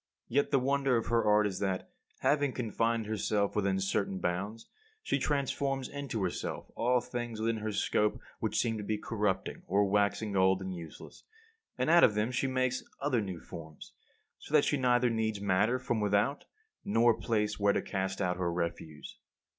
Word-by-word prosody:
Yet 140 Hz, +4 st, +1 dB
the 140 Hz, -, +3 dB
wonder 135 Hz, -1 st, +2 dB
of 115 Hz, -, -3 dB
her 115 Hz, -1 st, +3 dB
art 105 Hz, 0 st, +4 dB
is 95 Hz, -3 st, -2 dB
that, 95 Hz, -2 st, -2 dB, 0.3 s
having 145 Hz, -2 st, +2 dB
confined 115 Hz, -1 st, 0 dB
herself 105 Hz, -1 st, 0 dB
within 100 Hz, -2 st, +1 dB
certain 95 Hz, 0 st, -1 dB
bounds, 100 Hz, +6 st, -3 dB, 0.4 s
she -, -, 0 dB
transforms 135 Hz, -1 st, -1 dB
into 140 Hz, -7 st, -4 dB
herself 90 Hz, -, -4 dB
all 125 Hz, +1 st, +2 dB
things 120 Hz, -2 st, -5 dB
within 115 Hz, 0 st, 0 dB
her 110 Hz, 0 st, -3 dB
scope 105 Hz, +1 st, +1 dB, 0.2 s
which 110 Hz, -1 st, -1 dB
seem 115 Hz, -2 st, 0 dB
to -, -, -5 dB
be 105 Hz, +1 st, -1 dB
corrupting, 105 Hz, -3 st, -2 dB
or 100 Hz, +3 st, +3 dB
waxing 100 Hz, +1 st, +1 dB
old 95 Hz, 0 st, +4 dB
and 95 Hz, -1 st, -5 dB
useless; 85 Hz, -3 st, -10 dB, 0.5 s
and 155 Hz, -, +1 dB
out 170 Hz, 0 st, +7 dB
of 105 Hz, -, +5 dB
them 105 Hz, +3 st, 0 dB
she 125 Hz, +2 st, 0 dB
makes 130 Hz, -1 st, 0 dB, 0.2 s
other 130 Hz, -5 st, +1 dB
new 95 Hz, -4 st, -5 dB
forms; 80 Hz, -3 st, -11 dB, 0.5 s
so -, -, -3 dB
that -, -, +5 dB
she -, -, +2 dB
neither 125 Hz, -2 st, +3 dB
needs 110 Hz, -2 st, -1 dB
matter 100 Hz, +5 st, +2 dB
from 120 Hz, -3 st, -2 dB
without 105 Hz, +7 st, +1 dB, 0.4 s
nor 120 Hz, -, +4 dB
a 115 Hz, -, -3 dB
place 105 Hz, -2 st, 0 dB
where 100 Hz, 0 st, +3 dB
to -, -, 0 dB
cast 95 Hz, -1 st, -3 dB
out 90 Hz, -1 st, 0 dB
her 90 Hz, -2 st, -1 dB
refuse. 85 Hz, -3 st, -5 dB
110 Hz, 180 wpm, -31 LUFS, 100-125 Hz, 0.5 s, out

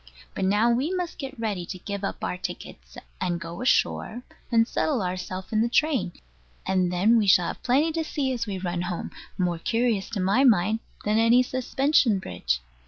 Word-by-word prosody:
But 190 Hz, -, -2 dB
now 210 Hz, +5 st, +3 dB
we 260 Hz, +8 st, 0 dB
must 360 Hz, -3 st, -3 dB
get 270 Hz, -3 st, -7 dB
ready 210 Hz, -6 st, -2 dB
to 185 Hz, -, -6 dB
give 200 Hz, +2 st, -6 dB
up 195 Hz, -, -4 dB
our -, -, -1 dB
tickets, 180 Hz, -, -8 dB, 0.2 s
and 175 Hz, -2 st, -1 dB
go 170 Hz, +1 st, -7 dB
ashore, 250 Hz, -1 st, +1 dB, 0.3 s
and 225 Hz, -1 st, +4 dB
settle 265 Hz, -7 st, 0 dB
ourselves 185 Hz, +2 st, -5 dB
in 215 Hz, -, +3 dB
the 235 Hz, -, +1 dB
train; 280 Hz, -, +1 dB, 0.5 s
and 185 Hz, -2 st, +1 dB
then 210 Hz, +6 st, +4 dB
we 210 Hz, -, +1 dB
shall 180 Hz, -3 st, +5 dB
have -, -, -7 dB
plenty 280 Hz, +6 st, +2 dB
to 325 Hz, 0 st, -1 dB
see 275 Hz, -4 st, -2 dB
as 230 Hz, -2 st, -3 dB
we 195 Hz, -2 st, -3 dB
run 175 Hz, -1 st, -3 dB
home; 175 Hz, -1 st, -4 dB, 0.3 s
more 175 Hz, -2 st, 0 dB
curious, 230 Hz, 0 st, 0 dB
to 225 Hz, -, -4 dB
my 195 Hz, +8 st, +3 dB
mind, 215 Hz, -3 st, +4 dB, 0.3 s
than 210 Hz, +1 st, +2 dB
any 235 Hz, +2 st, +5 dB
suspension 255 Hz, -2 st, +2 dB
bridge. 65 Hz, -, -2 dB
215 Hz, 190 wpm, -25 LUFS, 185-250 Hz, 0.5 s, shall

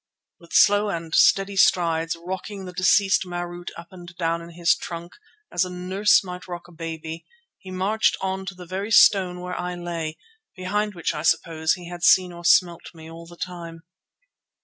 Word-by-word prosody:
With 170 Hz, -, -18 dB
slow 205 Hz, +1 st, +5 dB
and 165 Hz, -3 st, -5 dB
stately 195 Hz, 0 st, +4 dB
strides, 165 Hz, -4 st, +2 dB
rocking 190 Hz, +3 st, -6 dB
the 180 Hz, -, -8 dB
deceased 195 Hz, +2 st, +3 dB
Marût 175 Hz, -1 st, -6 dB
up 170 Hz, 0 st, -11 dB
and 175 Hz, -2 st, -12 dB
down 165 Hz, -1 st, -1 dB
in 170 Hz, -, -11 dB
his 170 Hz, 0 st, +3 dB
trunk, 170 Hz, 0 st, -7 dB, 0.4 s
as -, -, +1 dB
a 185 Hz, -, -4 dB
nurse 185 Hz, +4 st, +2 dB
might 180 Hz, -1 st, -8 dB
rock 175 Hz, -1 st, -7 dB
a -, -, -17 dB
baby, 165 Hz, 0 st, -7 dB, 0.4 s
he 190 Hz, -, -12 dB
marched 195 Hz, +4 st, +1 dB
on 190 Hz, 0 st, -3 dB
to 190 Hz, -, -5 dB
the 180 Hz, 0 st, -11 dB
very 190 Hz, +4 st, -4 dB
stone 185 Hz, -5 st, +5 dB
where 180 Hz, 0 st, -5 dB
I 180 Hz, 0 st, -4 dB
lay, 170 Hz, -3 st, -5 dB, 0.4 s
behind 205 Hz, +3 st, -2 dB
which 170 Hz, -, -2 dB
I 150 Hz, -, -4 dB
suppose 160 Hz, 0 st, +1 dB
he 175 Hz, -2 st, -11 dB
had 175 Hz, 0 st, -8 dB
seen 180 Hz, 0 st, +5 dB
or 170 Hz, 0 st, -11 dB
smelt 170 Hz, 0 st, +2 dB
me 160 Hz, 0 st, -11 dB
all 165 Hz, 0 st, -11 dB
the 175 Hz, 0 st, -14 dB
time. 170 Hz, -2 st, -7 dB
175 Hz, 185 wpm, -23 LUFS, 170-190 Hz, 0.4 s, slow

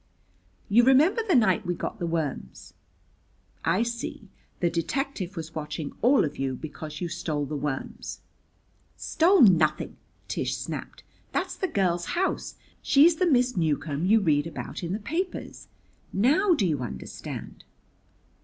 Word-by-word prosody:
"You 230 Hz, +4 st, +5 dB
remember 295 Hz, -, +5 dB
the 425 Hz, -7 st, +1 dB
night 195 Hz, -8 st, +4 dB
we 175 Hz, 0 st, -2 dB
got -, -, -5 dB
the 170 Hz, -, -2 dB
worms?" 160 Hz, -4 st, -4 dB, 0.9 s
"I 230 Hz, -, +2 dB
see. 235 Hz, -3 st, -5 dB, 0.3 s
The 175 Hz, -, +2 dB
detective 190 Hz, -, -2 dB
was 165 Hz, 0 st, -6 dB
watching 150 Hz, -1 st, -4 dB
all 255 Hz, -2 st, +5 dB
of 145 Hz, -2 st, -6 dB
you 135 Hz, -1 st, -1 dB
because 155 Hz, +3 st, -8 dB
you 175 Hz, -, -1 dB
stole 150 Hz, -3 st, -2 dB
the 150 Hz, -, -5 dB
worms." 145 Hz, -2 st, -4 dB, 0.8 s
"Stole 355 Hz, +3 st, +3 dB
nothing!" 160 Hz, -8 st, +4 dB, 0.3 s
Tish -, -, -2 dB
snapped. -, -, -6 dB, 0.3 s
"That's -, -, -1 dB
the 380 Hz, -, -1 dB
girl's 180 Hz, -, 0 dB
house. 380 Hz, +1 st, -1 dB, 0.3 s
She's 315 Hz, +4 st, +5 dB
the 365 Hz, -, +2 dB
Miss 250 Hz, -4 st, +3 dB
Newcomb 155 Hz, -1 st, 0 dB
you 220 Hz, +3 st, +6 dB
read 150 Hz, -4 st, +2 dB
about 165 Hz, -, -6 dB
in 175 Hz, 0 st, -3 dB
the 210 Hz, -, -2 dB
papers. 340 Hz, -, -4 dB, 0.4 s
Now 315 Hz, -, +3 dB
do 215 Hz, -, +1 dB
you 155 Hz, -6 st, 0 dB
understand?" 90 Hz, -, -7 dB
185 Hz, 145 wpm, -26 LUFS, -, 0.9 s, you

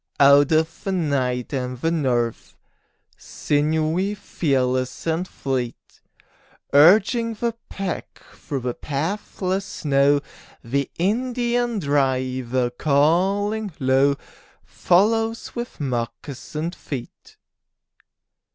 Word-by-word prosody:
Out 140 Hz, +1 st, +6 dB
of 160 Hz, +1 st, +1 dB
the 195 Hz, -, -2 dB
night 140 Hz, -8 st, -1 dB
and 125 Hz, -1 st, -3 dB
the 165 Hz, +5 st, 0 dB
north, 125 Hz, -8 st, -1 dB, 0.6 s
Sinewy, 160 Hz, +6 st, 0 dB
fearless 130 Hz, -9 st, -1 dB
and 165 Hz, +3 st, -1 dB
fleet, 130 Hz, -7 st, -4 dB, 0.7 s
Urging 215 Hz, -, +5 dB
the 235 Hz, +2 st, -1 dB, 0.2 s
pack 195 Hz, -3 st, -5 dB
through 140 Hz, -4 st, -5 dB
the 125 Hz, 0 st, -2 dB
pathless 185 Hz, -, -3 dB
snow, 145 Hz, -5 st, +2 dB, 0.4 s
The 135 Hz, +3 st, -1 dB
Indian 240 Hz, +4 st, 0 dB
driver, 130 Hz, -5 st, 0 dB
calling 185 Hz, -, +1 dB
low, 135 Hz, +1 st, +3 dB, 0.5 s
Follows 225 Hz, +5 st, +1 dB
with 240 Hz, 0 st, -6 dB
moccasined 140 Hz, +5 st, -4 dB
feet. 135 Hz, -8 st, -8 dB
150 Hz, 85 wpm, -23 LUFS, 130-195 Hz, 0.7 s, Out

